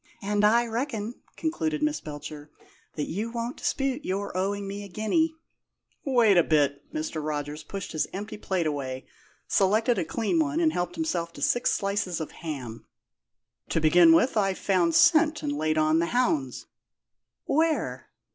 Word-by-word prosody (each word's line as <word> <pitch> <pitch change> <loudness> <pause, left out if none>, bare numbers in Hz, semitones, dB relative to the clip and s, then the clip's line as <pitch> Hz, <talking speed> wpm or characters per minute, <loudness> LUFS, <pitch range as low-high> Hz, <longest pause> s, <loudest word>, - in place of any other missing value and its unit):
"And 205 +1 0
I 230 +3 +5
reckon," 230 -1 -4 0.2
concluded 160 - -1
Miss 150 0 0
Belcher, 150 0 -8 0.5
"that 150 - -2
you 210 +7 -3
won't 235 +1 -4
dispute 270 +1 -1
your 195 0 -3
owing 200 +2 -1
me 200 +1 -5
a - - -8
guinea." 305 - 0 0.7
"Wait 235 - +4
a 175 - +6
bit!" 145 -2 +1
Mr. 155 0 -4
Rogers 150 0 -3
pushed 195 -1 -6
his 155 - -1
empty 205 +2 -6
plate 190 -4 -2
away, 135 -4 -3 0.4
selected 215 +5 +2
a - - +1
clean 225 - -1
one, 310 0 +1
and 320 -2 +2
helped 175 0 -2
himself 175 - -2
to - - -11
six 245 - +2
slices 195 -4 -1
of 160 - -5
ham. 130 -8 -7 0.8
"To - - +1
begin 165 +2 +6
with, 220 +9 +4
I've 195 -2 +1
found 175 -4 +1
scent 310 -2 +5
and 295 - -1
laid 155 - 0
on 155 +1 +3
the 170 - +1
hounds." 160 - 0 0.8
"Where?" 320 +2 0
195 Hz, 160 wpm, -27 LUFS, 155-235 Hz, 0.8 s, a